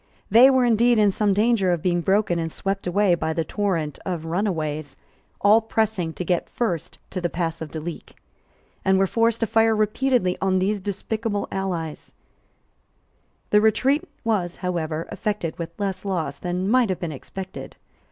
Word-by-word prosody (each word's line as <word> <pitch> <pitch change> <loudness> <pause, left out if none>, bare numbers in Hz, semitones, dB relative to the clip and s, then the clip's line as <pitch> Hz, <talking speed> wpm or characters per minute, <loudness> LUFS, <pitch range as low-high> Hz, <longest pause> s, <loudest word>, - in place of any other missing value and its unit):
They 240 +5 +8
were 260 -2 +4
indeed 235 +1 +4
in 210 -2 +4
some 205 +1 +1
danger 205 -2 +2
of 170 -3 -1
being 175 -1 +1
broken 190 -1 +1
and 165 -1 -3
swept 195 +2 -3
away 195 +1 +3
by 160 -1 -1
the 165 - 0
torrent 170 -7 -2
of 175 -4 -4
runaways, 160 -5 -2 0.4
all 210 +3 +6
pressing 220 -6 0
to 180 - -5
get 175 0 0
first 205 - -2
to 185 - -3
the 175 - 0
pass 165 -2 -3
of 160 - -5
Duleek, 160 +2 -7 0.7
and 190 0 +3
were 195 - +4
forced 230 +3 +1
to - - +3
fire 225 0 +3
repeatedly 215 -2 +1
on 190 -1 +2
these 200 +3 +1
despicable 205 +2 -3
allies, 175 -5 -4 1.4
The 210 - +5
retreat 265 - +3 0.2
was, 195 -6 0
however, 165 -3 -2
effected 205 -7 -3
with 165 0 -4
less 195 -2 -2
loss 165 -8 -2
than 180 +1 -2
might 245 0 +3
have 185 - -1
been 170 -3 -3
expected. 185 +6 -8
190 Hz, 165 wpm, -23 LUFS, 170-215 Hz, 1.4 s, They